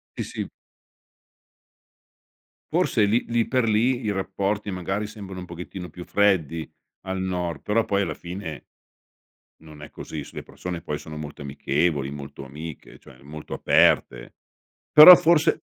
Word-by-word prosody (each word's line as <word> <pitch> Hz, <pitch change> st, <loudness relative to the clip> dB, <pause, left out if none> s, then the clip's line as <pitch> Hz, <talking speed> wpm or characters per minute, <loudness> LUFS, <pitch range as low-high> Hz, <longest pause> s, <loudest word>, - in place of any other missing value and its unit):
Sì, -, -, -3 dB
sì. -, -, -6 dB, 2.2 s
Forse 105 Hz, -, +2 dB
lì 115 Hz, +4 st, +1 dB
lì 115 Hz, -1 st, +1 dB
per 130 Hz, -1 st, +1 dB
lì 120 Hz, +4 st, +2 dB
i 105 Hz, -, -1 dB
rapporti 100 Hz, +1 st, -2 dB
magari 95 Hz, +3 st, -3 dB
sembrano 100 Hz, -4 st, -9 dB
un 90 Hz, -, -7 dB
pochettino 90 Hz, +1 st, -8 dB
più 90 Hz, +3 st, -10 dB
freddi 85 Hz, -6 st, +1 dB, 0.4 s
al 95 Hz, 0 st, -3 dB
nord, 90 Hz, -3 st, -3 dB
però 110 Hz, +2 st, 0 dB
poi 100 Hz, 0 st, 0 dB
alla -, -, -2 dB
fine 85 Hz, -5 st, -7 dB, 1.0 s
non 75 Hz, -2 st, -14 dB
è 75 Hz, -, -10 dB
così. 75 Hz, -3 st, -7 dB
Su -, -, -15 dB
le -, -, -6 dB
persone 90 Hz, -2 st, -7 dB
poi 75 Hz, -, -4 dB
sono 75 Hz, -1 st, -9 dB
molto 75 Hz, -1 st, -8 dB
amichevoli, 70 Hz, +1 st, -1 dB
molto 70 Hz, -1 st, -9 dB
amiche, 75 Hz, +3 st, -10 dB
cioè 65 Hz, +1 st, -17 dB
molto 75 Hz, +2 st, -9 dB
aperte. -, -, +2 dB, 0.6 s
Però 155 Hz, +4 st, +12 dB
forse 160 Hz, -1 st, +2 dB
90 Hz, 145 wpm, -24 LUFS, 75-105 Hz, 2.2 s, Però